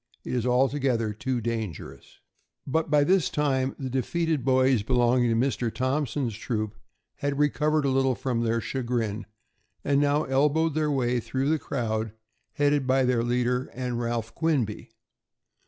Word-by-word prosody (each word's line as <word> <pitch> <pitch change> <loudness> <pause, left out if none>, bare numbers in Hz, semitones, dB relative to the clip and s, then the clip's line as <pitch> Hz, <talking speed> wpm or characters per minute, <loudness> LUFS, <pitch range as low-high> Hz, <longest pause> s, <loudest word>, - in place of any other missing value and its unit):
It - - -5
is 125 -1 0
altogether 125 -3 +1
too 125 +3 -2
dangerous." 105 - -5 0.5
But 160 +4 0
by 145 -1 +4
this 185 +2 +3
time 135 -3 0
the 135 - -4
defeated 150 +3 -1
boys 130 -2 +3
belonging 120 +1 +2
to 115 - +2
Mr. 120 -1 0
Thompson's 130 -1 -1
troop 110 -2 -3 0.4
had 140 -1 -2
recovered 150 +1 +1
a - - +2
little 135 -1 +2
from 120 -2 -2
their 115 0 +1
chagrin, 115 -3 -2 0.6
and 140 0 +2
now 145 +1 +2
elbowed 150 +4 +2
their 155 0 0
way 125 -3 +1
through 130 +4 -2
the 160 0 +2
crowd, 110 -6 -2 0.4
headed 145 -2 +1
by 130 0 +3
their 125 -2 +2
leader 125 +1 0
and 125 -1 -3
Ralph 115 -1 -3
Quinby. 140 -10 -1
130 Hz, 150 wpm, -26 LUFS, 120-145 Hz, 0.6 s, by